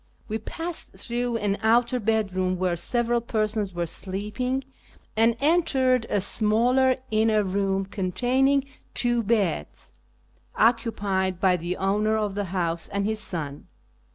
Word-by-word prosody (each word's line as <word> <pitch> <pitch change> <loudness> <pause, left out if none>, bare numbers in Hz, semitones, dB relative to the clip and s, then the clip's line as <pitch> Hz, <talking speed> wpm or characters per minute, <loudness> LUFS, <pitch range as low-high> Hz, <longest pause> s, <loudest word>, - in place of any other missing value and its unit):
We 220 0 -2
passed 330 +9 -4
through 240 0 -2
an 205 -2 -1
outer 240 +3 +3
bedroom 195 -4 0
where 180 -1 0
several 235 +6 +1
persons 215 -3 -1
were 175 -1 -2
sleeping, 210 +10 -3 0.5
and 225 +1 +3
entered 265 -6 +2
a 205 - +1
smaller 240 +6 +2 0.2
inner 215 -1 +3
room 195 0 0
containing 250 +9 +1 0.3
two 240 -1 +2
beds, 180 - -1 0.6
occupied 200 -5 +1
by 185 -1 +4
the 175 +1 -3
owner 210 +3 +1
of 210 -2 -1
the 205 0 -2
house 170 -2 -2
and 200 0 -2
his 220 0 0
son. 150 -8 -4
215 Hz, 125 wpm, -25 LUFS, 190-240 Hz, 0.6 s, by